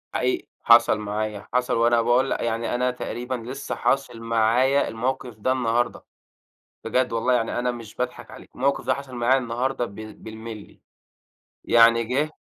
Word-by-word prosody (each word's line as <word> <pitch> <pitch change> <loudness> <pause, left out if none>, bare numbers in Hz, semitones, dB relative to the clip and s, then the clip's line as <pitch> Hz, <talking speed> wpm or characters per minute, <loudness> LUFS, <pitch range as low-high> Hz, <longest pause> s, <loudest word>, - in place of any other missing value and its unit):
حقيقي، 360 -2 -1 0.2
حصل 115 -2 +6
معايا، 105 0 -4
حصل 125 -1 +1
وأنا 120 0 +4
باقول 120 +3 +2
ل - - 0
يعني 115 +1 -1
أنا 125 +1 +1
تقريبًا 125 +1 -4
لسه 125 +4 -5
حاصل 135 -4 0
معايا 115 +5 +2
الموقف 125 0 -3
ده 130 +5 +1
النهارده، 120 -2 0 0.8
بجد 125 -2 0
والله 115 +2 +1
يعني 120 -1 0
أنا 125 0 0
مش 115 -3 -10
باضحك 125 0 -4
عليك، - - -12
الموقف 140 +2 0
ده - - +3
حصل 135 -2 -8
معايا 120 +2 +3
النهارده 125 +1 -1
ب 100 - -11
بالمللي، 110 0 -10 0.8
يعني 115 0 +5
جِه 140 +7 -1
120 Hz, 155 wpm, -24 LUFS, 115-130 Hz, 0.8 s, حصل